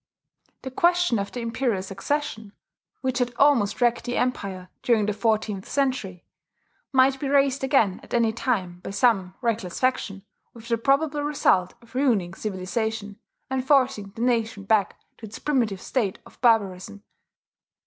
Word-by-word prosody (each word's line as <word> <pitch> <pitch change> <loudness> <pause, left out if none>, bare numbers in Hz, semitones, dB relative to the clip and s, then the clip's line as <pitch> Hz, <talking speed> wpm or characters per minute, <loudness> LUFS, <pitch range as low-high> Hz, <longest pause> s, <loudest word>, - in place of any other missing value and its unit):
The 260 - -5
question 350 -4 +2
of 200 - -4
the 245 - -5
imperial 230 -4 -1
succession, 220 +2 -3 0.5
which 260 -1 -1
had 245 -1 -1
almost 260 -6 +3
wrecked 240 -1 +2
the 245 - -2
empire 195 -7 -2
during 225 -4 +2
the 210 - 0
fourteenth 215 -2 -1
century, 255 -10 -1 0.7
might 265 0 +4
be 275 - -2
raised 275 -1 +2
again 230 -9 +2
at - - -17
any 230 -2 +2
time 190 -8 -2
by - - -8
some 195 -3 +1
reckless 225 -7 -2
faction, 210 -6 -1 0.3
with 230 0 -12
the 230 -1 +1
probable 290 +4 +2
result 280 -11 +1
of 230 - -20
ruining 230 -10 +1
civilization, 210 +2 -3 0.3
and 265 -1 -2
forcing 260 -7 +2
the 225 - -6
nation 225 -4 0
back 200 -2 +1 0.2
to 220 - -8
its 210 - -9
primitive 235 -10 0
state 215 -8 -1
of - - -18
barbarism. 205 -4 +1
230 Hz, 150 wpm, -25 LUFS, 200-260 Hz, 0.7 s, might